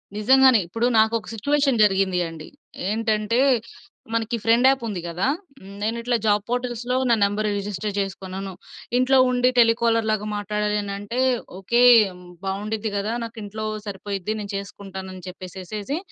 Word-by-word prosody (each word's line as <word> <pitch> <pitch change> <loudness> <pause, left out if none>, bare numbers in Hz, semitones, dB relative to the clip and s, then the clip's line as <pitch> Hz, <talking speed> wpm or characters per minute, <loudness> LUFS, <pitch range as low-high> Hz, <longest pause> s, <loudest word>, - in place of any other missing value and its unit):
నిజంగానే 260 +3 +5
ఇప్పుడు 230 +7 -1
నాకొక 220 0 +2
సిట్యుయేషన్ 280 +2 +1
జరిగింది 190 -2 +2
అండి. 160 -1 -10 0.4
ఏంటంటే, 220 +1 0 0.7
మనకి 230 +1 0
ఫ్రెండ్ 235 +3 +4
యాప్ 270 -2 +1
ఉంది 195 -5 -4
గదా! 175 +6 -1 0.5
నేను 220 +2 0
ఇట్లా 240 +1 0
జాబ్ 205 -1 +3
పోర్ట్‌ల్స్‌లో 245 0 -2
నా 235 - +5
నంబర్ 205 +1 +1
రిజిస్టర్ 205 0 -4
చేసుకున్నాను. 195 0 -5 0.4
ఇంట్లో 255 +1 +4
ఉండి 250 0 +3
టెలికాలర్‌లాగా 230 -2 +3
మాట్లాడాలి 210 0 -1
అనంటే 205 +4 -4 0.4
ఓకే. 235 +6 +1 0.6
బావుండిద్ది 210 +3 -3
గదా! 205 +3 -2
నాకు 230 0 -8
ఇంట్లో 215 +2 -5 0.2
సరిపోయిద్ది 200 +1 -4
నేను 200 0 -6
చేసుకుంటాను 195 -1 -7
అని 185 - -10
చెప్పేసేసేసి 190 - -6
215 Hz, 130 wpm, -23 LUFS, 200-230 Hz, 0.7 s, నిజంగానే